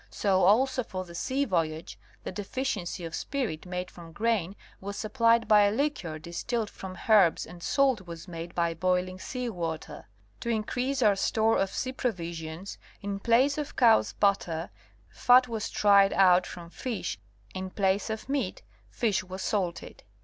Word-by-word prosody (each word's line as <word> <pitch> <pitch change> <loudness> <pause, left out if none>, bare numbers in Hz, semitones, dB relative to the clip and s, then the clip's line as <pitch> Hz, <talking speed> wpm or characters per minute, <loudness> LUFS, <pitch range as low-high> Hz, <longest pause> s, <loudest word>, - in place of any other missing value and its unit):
So 190 -2 +1
also 255 +6 +4
for 185 -5 -6
the 170 - -12
sea 265 +10 -1
voyage, 165 - -2 0.2
the - - -5
deficiency 205 -5 -3
of 165 - -7
spirit 235 - -3
made 180 0 -4
from 165 -2 -12
grain 205 -3 0 0.2
was 200 +1 -6
supplied 230 +1 +2
by 210 -2 +6
a 205 0 +4
liquor 225 - -2
distilled 190 +8 -3
from 185 -1 -8
herbs, 210 -7 +5
and 175 +1 -12
salt 260 -5 +1
was 170 +1 -8
made 170 -1 -7
by 170 -1 +1
boiling 185 +2 0
sea 250 +4 -4
water. 165 - -5 0.3
To 235 - -4
increase 245 +4 -1
our 210 -2 +5
store 220 +3 +2
of 195 - +1
sea 255 - -3
provisions, 170 -6 -4 0.2
in 200 0 -3
place 255 +7 +3
of 295 - -5
cow's 230 -3 +4
butter, 175 - 0 0.4
fat 250 +1 +5
was 225 -3 -3
tried 200 -1 +5
out 185 -2 +5
from 170 -1 -9
fish, 225 - -4 0.3
in 185 0 -4
place 195 +2 0
of 220 +1 -5
meat 280 0 -2 0.3
fish 215 -6 0
was 185 +1 -7
salted. 185 -5 -3
200 Hz, 160 wpm, -28 LUFS, 175-230 Hz, 0.4 s, by